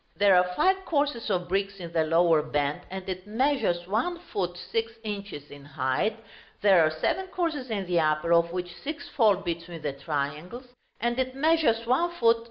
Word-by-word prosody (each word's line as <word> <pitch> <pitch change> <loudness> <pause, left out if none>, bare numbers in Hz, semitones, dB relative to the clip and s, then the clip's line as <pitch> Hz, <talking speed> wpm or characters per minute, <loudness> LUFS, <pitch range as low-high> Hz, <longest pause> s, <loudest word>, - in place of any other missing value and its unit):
There 200 -1 +5
are 180 0 +2
five 380 - +2
courses 285 -9 -1
of 180 -3 0
bricks 195 +2 -1
in 170 -3 -8
the 165 -1 +3
lower 165 0 +4
band, 145 -1 -1
and 190 0 -7
it 185 +1 -5
measures 220 -7 +1
1 230 - -1 0.2
ft. 180 -3 -2
6 225 0 0
in. 205 -2 -3 0.3
in 145 -1 -11
height: 145 +9 -1 0.4
there 195 -4 +6
are 155 - +4
seven 155 - -1
courses 325 -8 -2
in 200 -4 -2
the 175 -1 +1
upper 155 +1 +2
(of 170 0 +3
which 180 -1 -4
six 300 0 -5
fall 220 -7 +4
between 170 -3 -5
the 145 -2 -2
triangles), 150 - -4 0.3
and 240 +3 -1
it 260 0 -1
measures 275 -6 +2
1 330 +9 +1
ft. 230 -5 +4
195 Hz, 180 wpm, -27 LUFS, 170-245 Hz, 0.4 s, there